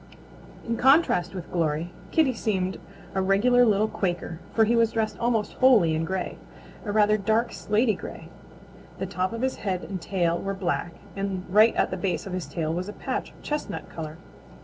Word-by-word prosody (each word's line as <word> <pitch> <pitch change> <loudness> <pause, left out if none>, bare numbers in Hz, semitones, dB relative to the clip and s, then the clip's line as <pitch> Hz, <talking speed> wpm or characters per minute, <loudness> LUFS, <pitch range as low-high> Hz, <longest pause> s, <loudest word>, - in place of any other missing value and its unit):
In 230 0 -1
contrast 250 - +4
with 180 -2 -7
Glory, 165 0 -1 0.2
Kitty 305 -5 +3
seemed 190 -5 -1 0.3
a 190 - +1
regular 215 +6 +4
little 215 -2 +3
Quaker, 175 -5 -3
for 225 - +4
he 235 +2 +2
was 230 -1 +3
dressed 220 -1 0
almost 230 -3 0
wholly 230 -11 +5
in 160 +1 0
gray, 190 +1 -3 0.4
a 205 - -3
rather 210 0 +4
dark, 220 +4 +1
slaty 215 +2 +1
gray. - - -9 0.7
The 190 - -3
top 185 0 -2
of 230 +2 -4
his 260 - 0
head 185 -3 -2
and 190 -3 -5
tail 170 -1 0
were 195 0 -3
black, 175 -2 -2 0.2
and 195 -2 -3
right 215 +5 +5
at - - +1
the - - -2
base 190 -3 -2
of 195 - -6
his 180 -5 -3
tail 160 +2 -2
was 180 +4 -3
a - - -6
patch - - -3
of - - -20
chestnut 300 0 -4
color. 155 -1 -7
195 Hz, 190 wpm, -26 LUFS, 180-225 Hz, 0.7 s, wholly